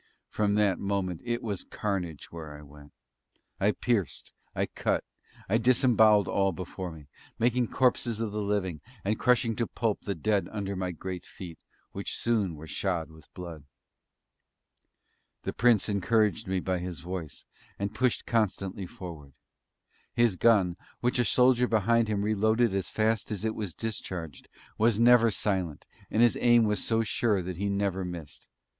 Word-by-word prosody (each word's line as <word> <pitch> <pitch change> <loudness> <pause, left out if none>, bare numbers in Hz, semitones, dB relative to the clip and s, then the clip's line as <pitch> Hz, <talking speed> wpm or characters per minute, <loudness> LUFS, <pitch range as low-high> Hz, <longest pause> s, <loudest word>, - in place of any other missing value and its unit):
From 105 -1 +1
that 105 -3 +2
moment 95 -4 -2
it 120 0 -2
was 105 -5 -3
carnage 90 -7 -4
where 80 -3 -8
I 75 - -12
went. 75 0 -15 0.7
I 100 +2 +3
pierced. 105 - -2 0.2
I - - +1
cut. - - -1 0.4
I 110 +4 +2
disembowelled 115 -4 +5
all 95 -1 +2
before 90 +1 -6
me 75 -3 -12 0.3
making 120 +1 +2
corpses 120 -3 +1
of 115 -2 -2
the 105 +1 -2
living, 100 -6 -1 0.2
and 105 +2 0
crushing 125 -2 +3
to 115 - 0
pulp 115 -3 -1
the 100 - -3
dead 100 +5 0
under 100 -2 -3
my 90 -1 -2
great 90 +1 -6
feet, 85 -4 -10 0.3
which - - -4
soon 105 -8 0
were 75 +1 -10
shod 85 -1 -2
with 80 -2 -17
blood. 85 -5 -8 1.8
The - - -3
Prince 120 -3 +3
encouraged 105 -2 +1
me 95 0 0
by 90 0 -1
his 90 -1 -5
voice, 90 -3 -6 0.3
and 100 +1 -3
pushed 125 +2 0
constantly 100 -4 -1
forward. 80 -7 -9 0.8
His 120 -5 +3
gun, 95 -4 +3 0.2
which 125 +1 +1
a 120 - +3
soldier 125 0 +4
behind 115 +1 +3
him 105 -2 0
reloaded 110 +1 +2
as 95 -1 -2
fast 110 0 0
as 105 0 -3
it 110 - 0
was 100 -8 -5
discharged, 90 -8 -5 0.3
was 110 -1 +3
never 120 -1 +6
silent, 95 -7 -1 0.2
and 115 - +3
his 120 - +3
aim 120 -1 +6
was 105 -3 +1
so 115 0 +1
sure 105 -3 +1
that 90 -1 -5
he 100 +2 -1
never 100 -1 0
missed. 85 -5 -8
100 Hz, 160 wpm, -28 LUFS, 90-115 Hz, 1.8 s, never